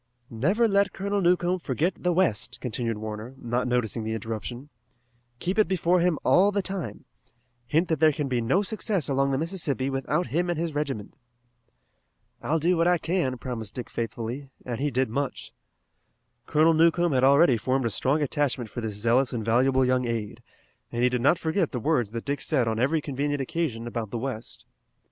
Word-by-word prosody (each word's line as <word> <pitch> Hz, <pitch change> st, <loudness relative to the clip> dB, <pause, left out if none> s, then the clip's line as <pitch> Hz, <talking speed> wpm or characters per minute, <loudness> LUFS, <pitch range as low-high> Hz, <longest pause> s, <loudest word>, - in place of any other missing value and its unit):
"Never 185 Hz, -, +2 dB
let 200 Hz, -1 st, +2 dB
Colonel 200 Hz, +1 st, -1 dB
Newcomb 180 Hz, 0 st, +2 dB
forget 160 Hz, +4 st, -1 dB
the 180 Hz, -, -1 dB
west," 125 Hz, -, +1 dB
continued 115 Hz, -2 st, -3 dB
Warner, 110 Hz, +4 st, -6 dB
not 120 Hz, 0 st, -2 dB
noticing 120 Hz, -2 st, 0 dB
the 110 Hz, +1 st, -2 dB
interruption. 115 Hz, +5 st, -6 dB, 0.7 s
"Keep 185 Hz, -, -1 dB
it 215 Hz, -, +5 dB
before 180 Hz, 0 st, +2 dB
him 175 Hz, -2 st, +2 dB
all 200 Hz, +3 st, +5 dB
the 200 Hz, -1 st, 0 dB
time. 190 Hz, -7 st, -4 dB, 0.6 s
Hint 160 Hz, +9 st, +2 dB
that 160 Hz, -3 st, 0 dB
there 155 Hz, -1 st, +6 dB
can 145 Hz, -1 st, -3 dB
be 125 Hz, -2 st, 0 dB
no 175 Hz, -, +2 dB
success 205 Hz, -, -1 dB
along 135 Hz, 0 st, +1 dB
the 135 Hz, -, 0 dB
Mississippi 150 Hz, -5 st, -2 dB
without 140 Hz, +6 st, -1 dB
him 175 Hz, +2 st, +1 dB
and 175 Hz, -, -1 dB
his 165 Hz, -1 st, -2 dB
regiment." 135 Hz, -8 st, -3 dB, 1.3 s
"I'll 160 Hz, -, 0 dB
do 170 Hz, +3 st, +2 dB
what 165 Hz, 0 st, +2 dB
I 180 Hz, 0 st, +4 dB
can," 165 Hz, -7 st, -1 dB
promised 115 Hz, -4 st, -6 dB
Dick 125 Hz, -, -6 dB
faithfully, 120 Hz, +4 st, -4 dB, 0.2 s
and 120 Hz, -1 st, -4 dB
he 145 Hz, +2 st, 0 dB
did 130 Hz, 0 st, +1 dB
much. 135 Hz, +4 st, -4 dB, 0.9 s
Colonel 160 Hz, +2 st, +4 dB
Newcomb 170 Hz, +1 st, +3 dB
had 130 Hz, -2 st, +2 dB
already 140 Hz, 0 st, +6 dB
formed 130 Hz, +3 st, 0 dB
a 115 Hz, -, 0 dB
strong 135 Hz, +7 st, +1 dB
attachment 135 Hz, -5 st, -1 dB
for 120 Hz, -, -5 dB
this 110 Hz, -2 st, -4 dB
zealous 120 Hz, +5 st, +2 dB
and 115 Hz, -3 st, -3 dB
valuable 130 Hz, +3 st, +3 dB
young 125 Hz, 0 st, +1 dB
aide, 115 Hz, -3 st, -4 dB, 0.5 s
and 120 Hz, +1 st, -1 dB
he 125 Hz, -, +5 dB
did 125 Hz, -1 st, -1 dB
not 140 Hz, +7 st, +4 dB
forget 165 Hz, +1 st, 0 dB
the 125 Hz, -, -1 dB
words 125 Hz, -4 st, +1 dB
that 115 Hz, +1 st, -6 dB
Dick 140 Hz, 0 st, -2 dB
said 130 Hz, -7 st, +1 dB
on 110 Hz, 0 st, -1 dB
every 145 Hz, +6 st, +2 dB
convenient 145 Hz, +1 st, -2 dB
occasion 135 Hz, -4 st, -2 dB
about 115 Hz, -2 st, -4 dB
the 120 Hz, -, -4 dB
west. 120 Hz, -2 st, -6 dB
135 Hz, 190 wpm, -26 LUFS, 120-165 Hz, 1.3 s, there